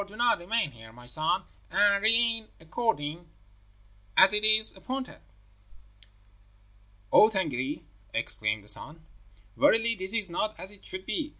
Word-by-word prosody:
Do 200 +1 -15
you - - -14 0.2
remain 185 -1 -1
here, 110 -2 -14
my 120 +2 -15
son, 155 +9 -1 0.3
and 200 +2 +3
reign 225 0 +3
according 165 -3 -3 0.9
as 190 +2 +7
it 210 0 +2
is 215 0 +3
appointed.' 260 0 -6 1.9
"'O 215 - +7
Tângâri,' 150 - -3 0.3
exclaimed 110 -2 -1
the - - -19
son, 155 +8 +1 0.5
'verily 230 +1 +3
this 190 0 -1
is 215 -4 +1
not 210 +5 -3
as 190 - -8
it 205 - -15
should 185 0 -5
be! 305 -2 -3
190 Hz, 135 wpm, -27 LUFS, 155-220 Hz, 1.9 s, as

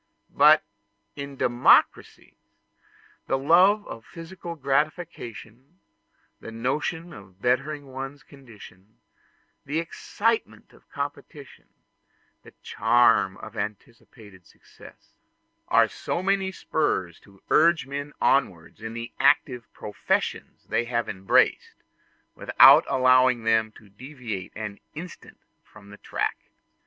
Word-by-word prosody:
But - - +6 0.5
in 140 -1 -8
democracies 120 -1 +2 0.9
the 135 - 0
love 180 +9 +4
of 115 - -9
physical 170 +2 -9
gratification, 140 - -4 0.6
the - - -10
notion 150 +8 -3
of 95 -2 -15
bettering 135 +6 -1
one's 135 +1 -8
condition, 110 -7 -16 0.7
the 145 +3 -4
excitement 215 +7 -3
of - - -23
competition, 140 0 -8 0.7
the - - -16
charm 115 -4 +2
of - - -11
anticipated 105 -4 -9
success, - - -19 0.5
are - - +4
so 175 - -4
many 195 0 0
spurs 95 - -2
to 100 -1 -22
urge 165 -2 +4
men 140 +2 -6
onwards 95 -10 0
in 110 0 -7
the 115 +1 -7
active 125 -4 +1
professions 105 - -3
they 120 - -2
have 120 0 -2
embraced, 95 0 +1 0.6
without - - +6
allowing 130 -2 +3
them 110 -1 +1
to 105 - -18
deviate 115 -3 -8
for - - -10
an 100 -1 -7 0.2
instant 170 +3 -10 0.3
from 100 -1 -17
the 105 - -12
track. - - -3
130 Hz, 110 wpm, -25 LUFS, 110-150 Hz, 0.9 s, But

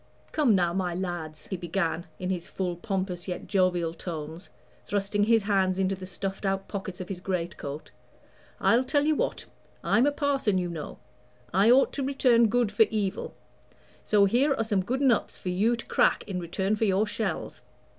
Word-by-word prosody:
"Come 280 -9 +3
now, 175 -2 +2
my 180 -2 -1
lads," 170 -4 -4
he 190 - -4
began, 175 -1 -2
in 185 0 -3
his 175 -2 -3
full, 180 -2 -3
pompous, 185 -1 -3
yet 180 -1 -4
jovial 180 -4 +1
tones, 165 +1 -7 0.3
thrusting 205 0 0
his 225 -1 +4
hands 190 -2 +1
into 190 0 +1
the 185 -1 -7
stuffed 195 +2 -5
out 195 0 -1
pockets 190 -2 -6
of 185 - -5
his 185 -2 -6
greatcoat, 170 -6 -4 0.7
"I'll 240 +3 +4
tell 290 +2 +1
you 310 - +3
what; - - -2 0.4
I'm 245 +4 +3
a - - +3
parson 280 -9 +1
you 180 -1 -1
know; 160 -3 -6 0.6
I 195 +5 +5
ought 260 +3 +5
to 280 - -2
return 255 -4 +4
good 240 -2 +1
for 210 +1 +4
evil. 205 -3 -2 0.7
So 205 -2 +4
here 265 +8 +3
are 225 - 0
some 210 -3 +1
good 255 +8 -2
nuts 255 -5 +2
for 180 - -5
you 210 +7 +2
to 235 - -8
crack - - +2
in 185 -2 -3
return 190 +4 -1
for 220 - 0
your 200 +1 +2
shells." 215 +1 -3
195 Hz, 185 wpm, -27 LUFS, 180-225 Hz, 0.7 s, I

